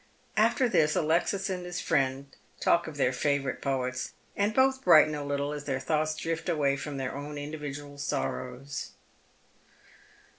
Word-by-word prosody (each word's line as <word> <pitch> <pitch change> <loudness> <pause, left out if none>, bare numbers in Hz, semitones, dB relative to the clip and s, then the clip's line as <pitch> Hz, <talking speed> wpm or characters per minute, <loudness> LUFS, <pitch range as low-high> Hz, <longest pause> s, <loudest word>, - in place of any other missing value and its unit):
After 230 +4 +3
this 150 -9 +3
Alexis 175 +5 +1
and 185 -2 -3
his 180 0 -4
friend 135 0 0 0.2
talk 170 - +3
of 155 -2 -7
their 130 -2 +2
favourite 140 +1 0
poets, 130 -2 -2 0.2
and 205 +1 +1
both 265 +2 +3
brighten 155 - +7
a 145 -1 -3
little 140 0 -1
aa 150 - -3
tlieir 140 -2 -2
thoughts 155 +2 0
drift 165 +2 -3
away 145 -4 +2
fi'om 145 0 -5
their 130 -1 -3
own 145 +1 -6
individual 145 -1 -6
sorrows. 135 -1 -3
145 Hz, 150 wpm, -29 LUFS, 140-165 Hz, 0.2 s, brighten